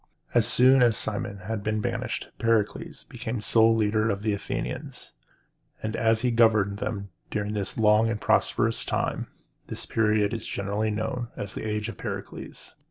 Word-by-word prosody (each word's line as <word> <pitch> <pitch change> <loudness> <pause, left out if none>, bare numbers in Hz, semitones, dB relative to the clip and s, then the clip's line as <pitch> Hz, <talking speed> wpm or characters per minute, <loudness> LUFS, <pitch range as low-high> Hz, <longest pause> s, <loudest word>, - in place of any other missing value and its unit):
As - - +4
soon 130 +1 +6
as 120 -3 +4
Cimon 100 -2 -2
had 105 +3 -3
been 110 0 0
banished, - - -3
Pericles 115 -2 0
became 120 -1 -5
sole 115 +1 +4
leader 110 0 +2
of 100 -1 -2
the 105 -1 +1
Athenians; 100 - -5 0.7
and 110 0 -2
as 115 0 +2
he 125 - +1
governed 110 -4 +3
them 100 -3 -4 0.2
during 105 0 -2
a 100 -2 -1
long 110 0 +4
and 115 -2 -2
prosperous - - +2
time, - - -1 0.4
this - - -2
period 105 -1 +2
is 115 - -4
generally 100 +2 -1
known 110 +3 -2
as 100 -1 -5
the 110 - -4
Age 105 0 -2
of 115 - -7
Pericles. - - -6
110 Hz, 165 wpm, -26 LUFS, 105-115 Hz, 0.7 s, soon